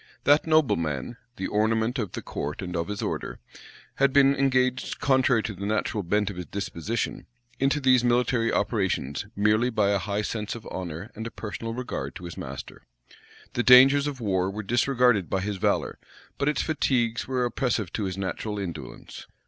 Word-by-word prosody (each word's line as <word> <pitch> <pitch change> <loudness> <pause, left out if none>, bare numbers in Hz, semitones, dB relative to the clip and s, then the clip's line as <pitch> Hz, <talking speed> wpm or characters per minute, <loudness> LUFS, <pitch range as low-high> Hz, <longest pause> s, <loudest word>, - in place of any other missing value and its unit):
That 145 +3 +4
nobleman 105 - +1 0.2
the 95 - -4
ornament 110 +4 +1
of 105 -6 -3
the - - -5
court 75 +6 -4
and 90 -1 -5
of 85 0 -1
his 105 -1 -4
order, - - -3 0.6
had 135 0 +3
been 140 0 +5
engaged, 130 -2 +1
contrary 130 -4 +3
to 105 - -3
the 100 +1 -5
natural 110 0 -1
bent 100 +3 0
of 95 - -10
his 90 - -6
disposition, 100 +2 -3 0.3
into 140 +2 +2
these 130 -3 +4
military 120 -1 +2
operations 95 - -1
merely 105 +4 +3
by 105 -4 +2
a 100 - +2
high 100 +2 -2
sense 105 0 -3
of 115 - -9
honor 85 -3 -6
and 110 +2 -6
a - - -5
personal 115 +1 -6
regard 125 0 -5
to 90 - -8
his 85 - -7
master. - - -8 0.7
The 120 - +1
dangers 135 +3 +7
of 140 -3 -4
war 95 -4 0
were 105 +2 -5
disregarded 120 -3 +2
by 95 - 0
his 100 0 -3
valor; 105 +1 0 0.4
but 140 - +2
its 150 - 0
fatigues 120 -7 0
were 125 -1 0
oppressive 120 -5 -1
to 105 - -2
his 95 -1 -4
natural 100 +2 -3
indolence. 85 -9 -7
110 Hz, 180 wpm, -26 LUFS, 100-125 Hz, 0.7 s, dangers